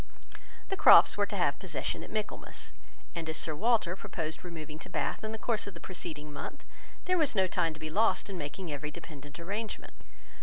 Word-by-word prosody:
The 390 - +1
Crofts - - +9
were 205 0 +2
to 205 - -4
have 145 -7 +2
possession 155 -8 -3
at - - -9
Michaelmas; 215 -1 -4 0.4
and 165 -2 -4
as 160 - -1
Sir 160 - +1
Walter 215 -2 +3
proposed 165 -6 -4
removing 155 -3 -7
to - - -10
Bath - - -1
in 215 - -2
the 220 - -3
course 220 -2 0
of 200 - -7
the - - -8
preceding 155 -4 -6
month, - - -6 0.4
there 365 -1 +3
was 300 -7 +2
no 190 -2 +5
time 170 -3 0
to - - -10
be 155 0 -5
lost 220 +7 +3
in 195 - -5
making 170 +2 -5
every 150 +1 -3
dependent 150 -2 -10
arrangement. 205 +6 -4
175 Hz, 200 wpm, -31 LUFS, 155-205 Hz, 0.4 s, Crofts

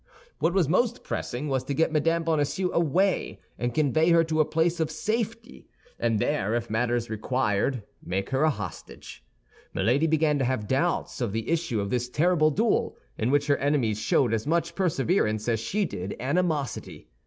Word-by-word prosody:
What 170 - +1
was 180 -6 +3
most 240 - +1
pressing 130 +4 -4
was 135 -2 0
to 140 - -2
get 160 +3 +2
Mme. 165 +2 +2
Bonacieux 160 +3 0
away, 175 +4 +1 0.2
and 120 0 -1
convey 155 +3 +2
her 170 -1 +5
to 160 -1 -1
a 155 - +5
place 165 +3 0
of 160 -2 0
safety, 225 +8 -4 0.3
and 115 -2 +1
there, 105 +1 0
if 120 -2 -3
matters 120 +1 0
required, 115 +1 0 0.2
make 95 +4 -3
her 135 +1 +1
a 155 - +4
hostage. 105 - -7 0.5
Milady 140 +8 +2
began 155 -2 +2
to 135 - +1
have 125 -4 -1
doubts 140 +3 0
of 115 -5 -1
the 110 0 -3
issue 165 -9 0
of 100 0 -3
this 125 0 -1
terrible 155 +2 +3
duel, 220 +9 0 0.2
in 110 - -1
which 145 +1 +2
her 145 -1 +2
enemies 130 -7 +1
showed 120 +1 +2
as 110 +4 -1
much 170 +1 0
perseverance 140 - 0
as 115 -2 +1
she 200 - -1
did 95 - -5
animosity. 145 -1 -2
145 Hz, 175 wpm, -26 LUFS, 120-165 Hz, 0.5 s, her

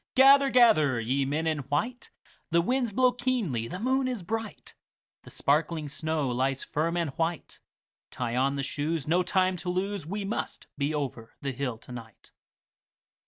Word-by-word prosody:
Gather, 275 +1 +7
gather, 185 - +5
ye 130 +4 0
men 150 +4 -1
in 155 -2 0
white; 155 - -2 0.4
The 170 - +3
winds 245 +4 0
blow 255 +4 +4
keenly, 235 - -1
the 180 - -6
moon 260 +3 +1
is 245 -7 -3
bright, 225 +3 -5 0.5
The - - -14
sparkling 155 +2 0
snow 155 0 -2
lies 130 +2 0
firm 165 +3 -1
and 165 -4 -1
white; 165 +3 -3 0.5
Tie 120 -1 -3
on 135 +2 +2
the 140 - -2
shoes, 145 +2 -2
no 175 +3 +3
time 185 0 +1
to 180 - -5
lose, 190 -2 -2
We 200 +3 -3
must 210 - -4
be 145 +1 -1
over 135 -7 -4
the 140 - -2
hill 125 -3 -3
to 120 - -14
night. 115 -3 -11
160 Hz, 165 wpm, -28 LUFS, 140-210 Hz, 0.5 s, Gather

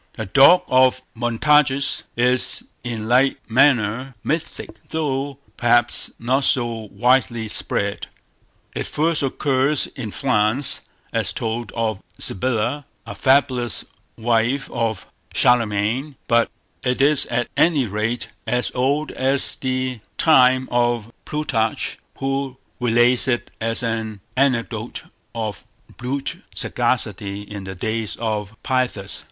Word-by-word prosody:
"The 110 - -5
Dog 140 - +6
of 130 0 +3
Montargis" 135 +4 +2 0.2
is 125 +1 +1 0.2
in 115 -3 -4
like 130 +3 +3
manner 125 0 +2
mythic, 160 +1 -3 0.2
though 140 -3 -2 0.2
perhaps 120 0 +3
not 130 +4 0
so 115 -4 0
widely 120 +1 +2
spread. 100 -1 -2 0.7
It - - -3
first 160 +1 +1
occurs 135 +1 +1
in 120 -5 -7
France, 125 +3 +2 0.3
as - - -1
told 115 -1 -3
of 110 -4 -2 0.2
Sybilla, 125 +6 0 0.2
a - - -7
fabulous 130 -3 +1 0.3
wife 120 +4 0
of 115 -3 -2 0.3
Charlemagne; 120 +4 +2
but 115 0 +3 0.3
it 125 -1 -1
is 145 +1 +4
at 120 0 -1
any 155 -6 +3
rate 110 +3 -2 0.2
as 125 +2 0
old 140 +4 0
as 135 +1 0
the 130 -2 -2 0.2
time 130 -4 +5
of 120 -2 0
Plutarch, 130 -8 -1 0.2
who 135 -1 -2 0.2
relates 120 +1 +4
it 120 -2 -1
as 115 +1 -1
an 110 -3 -3
anecdote 120 -4 -1 0.3
of 110 -3 -4 0.3
brute 135 +3 -3 0.2
sagacity 100 -4 0
in 100 -1 -8
the 95 0 -6
days 110 0 -3
of 110 -2 -3
Pyrrhus. 125 -7 -2
120 Hz, 115 wpm, -21 LUFS, 110-135 Hz, 0.7 s, Dog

